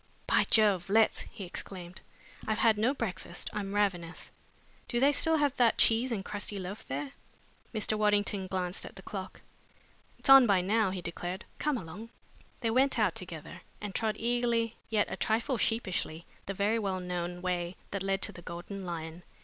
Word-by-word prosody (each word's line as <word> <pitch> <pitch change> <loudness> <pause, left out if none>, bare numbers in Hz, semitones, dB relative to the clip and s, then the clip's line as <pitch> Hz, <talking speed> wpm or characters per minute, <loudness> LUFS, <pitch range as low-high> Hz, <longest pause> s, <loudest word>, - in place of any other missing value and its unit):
"By - - +3
Jove, 200 -5 +4
let's!" 220 +2 +3
he 220 -4 -8
exclaimed. 180 0 -7 0.5
"I've 220 -1 +1
had 225 -1 +5
no 230 +5 +3
breakfast. 205 -9 -4
I'm 205 -1 -3
ravenous. 180 -5 -1 0.6
Do 240 - 0
they 280 +3 +5
still 320 +3 +3
have 290 -3 +2
that 240 -2 +4
cheese 230 +3 +4
and 200 -4 -2
crusty 205 0 -3
loaf 190 +2 -6
there?" 140 +1 -3 0.6
Mr. 215 -1 0
Waddington 205 -2 +1
glanced 185 -1 -2
at - - -10
the 190 - -11
clock. 190 -2 -6 0.8
"It's - - -8
on 270 -2 +10
by 195 -3 +4
now," 210 +2 +2
he 185 -1 -4
declared. 175 +2 -4
"Come 300 -3 +1
along." 200 +4 -8 0.5
They 230 -2 +1
went 260 +3 +3
out 210 -6 +3
together 170 -4 -7 0.2
and 205 -2 -5
trod 215 +1 0
eagerly 235 -1 +1
yet 215 -2 +3
a - - -4
trifle 230 +3 0
sheepishly 185 -8 0 0.2
the 195 - -3
very 210 +4 +2
well 195 -3 -1
known 180 0 -4
way 180 -1 -1 0.2
that 200 - -2
led 195 0 0
to - - 0
the 175 - -11
Golden 175 +3 -7
Lion. 165 -1 -5
200 Hz, 175 wpm, -31 LUFS, 180-225 Hz, 0.8 s, on